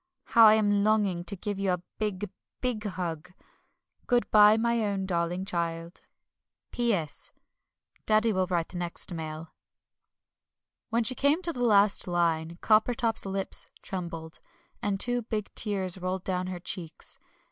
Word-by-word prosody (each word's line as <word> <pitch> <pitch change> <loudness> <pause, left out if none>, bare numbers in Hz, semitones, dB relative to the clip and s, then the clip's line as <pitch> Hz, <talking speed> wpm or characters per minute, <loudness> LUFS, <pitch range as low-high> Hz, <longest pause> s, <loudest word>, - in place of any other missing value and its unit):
How 230 -1 +7
I 215 - +7
am 205 -2 +2
longing 205 -5 +2
to 200 - -2
give 200 +1 -4
you 195 -1 +1
a 180 -1 -4 0.2
big, 210 -2 -2 0.3
big 245 -4 -2
hug. 175 -4 -4 0.7
Good 245 -1 +1
bye, 210 0 +7
my 235 0 +1
own 200 -2 -1
darling 175 0 -1
child. 170 -2 -3
MUMMIE. - - -35 0.6
P.S. 195 -12 -1 0.8
Daddy 215 +1 +3
will 185 -1 +1
write 175 -1 -1
next 175 0 -4
mail. 160 0 -6 1.4
When 230 +1 +1
she 255 - +3
came 285 +7 +2
to 335 -1 -1
the 245 - -3
last 205 -4 +4
line 170 -1 0
Coppertop's 225 0 +2
lips 195 0 -1
trembled, 170 -3 -5 0.4
and 200 -1 -1
two 245 +2 0
big 215 -2 -4
tears 190 -3 -2
rolled 185 0 -3
down 185 -1 -2
her 185 -1 -5
cheeks. 170 -3 -4
195 Hz, 145 wpm, -28 LUFS, 175-215 Hz, 1.4 s, How